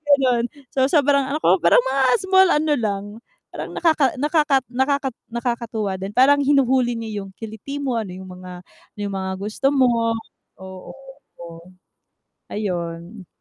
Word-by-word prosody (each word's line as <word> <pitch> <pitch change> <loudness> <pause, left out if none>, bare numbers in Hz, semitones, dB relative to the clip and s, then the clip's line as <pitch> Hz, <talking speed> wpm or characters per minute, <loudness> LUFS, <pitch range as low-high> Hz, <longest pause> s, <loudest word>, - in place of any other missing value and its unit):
ganun. 250 -3 +1 0.3
So, 265 -1 +2
sobrang 285 -2 +3
ano 305 - -1
ko, 180 +1 +4
parang 170 +8 +4
mga 265 0 0 0.2
small 380 0 +5
ano 300 0 +2
lang, 200 -3 -2 0.5
parang - - -6
nakaka 315 -4 +2
nakaka 295 -1 +2
nakaka 270 +2 0 0.2
nakakatuwa 230 -5 -3
din, 195 +3 -6
parang 280 +3 +5
hinuhuli 260 -3 +2
niya 220 -2 -5
yung 195 - -12
kiliti 220 +5 -8
mo, 255 -5 -1
ano 200 -5 -5
yung 190 0 -10
mga 180 0 -10
ano - - -28
yung 200 - -3
mga 190 0 -3
gusto 215 +7 -2
mo, 230 -3 +2 0.4
oo, 190 -1 -10 0.5
oo. 170 +2 -12 0.8
Ayun. 175 -1 -5
235 Hz, 150 wpm, -21 LUFS, 190-275 Hz, 0.8 s, small